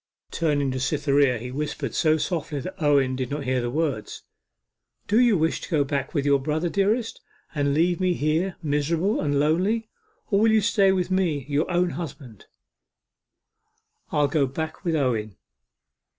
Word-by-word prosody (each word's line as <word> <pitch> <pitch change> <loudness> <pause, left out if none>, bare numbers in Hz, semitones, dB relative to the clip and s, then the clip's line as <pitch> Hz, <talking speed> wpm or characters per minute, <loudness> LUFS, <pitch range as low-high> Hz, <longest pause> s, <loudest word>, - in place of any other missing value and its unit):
Turning 145 -4 0
to 130 - -3
Cytherea 140 -1 +2
he 125 +3 -7
whispered 140 -2 -4
so 155 -1 +3
softly 155 -3 -3
that 185 +4 -8
Owen 140 -3 +3
did 130 -1 -3
not 145 0 -3
hear 130 -1 0
the 120 - -2
words 140 -5 -3 0.8
'Do 215 +3 +2
you 240 -5 +4
wish 160 0 0
to - - -8
go 155 -4 +2
back 140 -1 -3
with 145 -2 0
your 140 -1 +4
brother, 155 +5 -1
dearest, 215 +6 0 0.3
and 145 -2 0
leave 175 +3 +2
me 185 -1 +1
here 160 +5 0
miserable, 160 +7 0
and 145 -1 0
lonely, 190 +10 +1 0.4
or 200 - +4
will 220 +1 +4
you 220 -1 +4
stay 200 -2 +3
with 185 -1 -1
me, 170 -8 0
your 150 +4 0
own 175 0 +1
husband.' 140 - -8 1.6
'I'll 145 -1 +2
go 140 -2 +1
back 155 +6 -5
with 170 -3 0
Owen. 110 - -1
150 Hz, 165 wpm, -24 LUFS, 140-180 Hz, 1.6 s, you